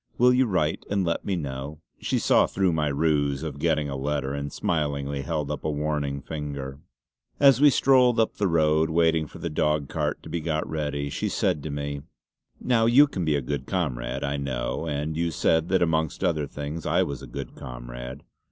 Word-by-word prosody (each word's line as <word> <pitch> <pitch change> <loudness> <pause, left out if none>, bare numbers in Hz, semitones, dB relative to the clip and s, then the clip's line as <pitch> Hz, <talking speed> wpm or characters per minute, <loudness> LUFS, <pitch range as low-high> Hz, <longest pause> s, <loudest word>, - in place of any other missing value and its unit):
Will 125 +1 +5
you 130 0 +3
write 80 -6 0
and 100 -2 +1
let 85 - -1
me 100 - 0
know?" 70 -1 -5 0.2
She - - -1
saw - - +4
through 95 -3 +1
my 75 -2 +1
ruse 70 -1 +1
of 75 -3 -5
getting 75 -2 +1
a 70 - -4
letter, 70 0 -2
and 70 0 -4
smilingly 70 -3 -1
held 75 +1 -2
up 75 - -5
a - - -1
warning 75 -2 -2
finger. 70 -3 -5 0.6
As 140 -2 +6
we 145 - +8
strolled 125 -3 +4
up 110 - +1
the 100 - +1
road, 80 -1 +3
waiting 80 -1 +2
for - - -12
the - - -4
dog 75 -2 0
cart - - -2
to - - -9
be 85 - -2
got 80 -1 -1
ready, 75 -2 -3
she - - -2
said 75 - 0
to 80 - -5
me: 70 0 -4 0.6
"Now 115 -3 +2
you 130 +5 +7
can 100 -11 -4
be 80 -2 +2
a 70 - -1
good 70 +3 -3
comrade 70 -11 -2
I 70 0 -1
know; 65 +2 -3
and 75 +1 -2
you 85 +1 0
said 80 +2 +1
that, 95 -1 +3
amongst 80 0 0
other 80 -5 +1
things, 75 +3 -5
I - - +3
was 70 -3 -5
a - - -9
good - - -7
comrade. - - -8
75 Hz, 205 wpm, -26 LUFS, 70-85 Hz, 0.6 s, we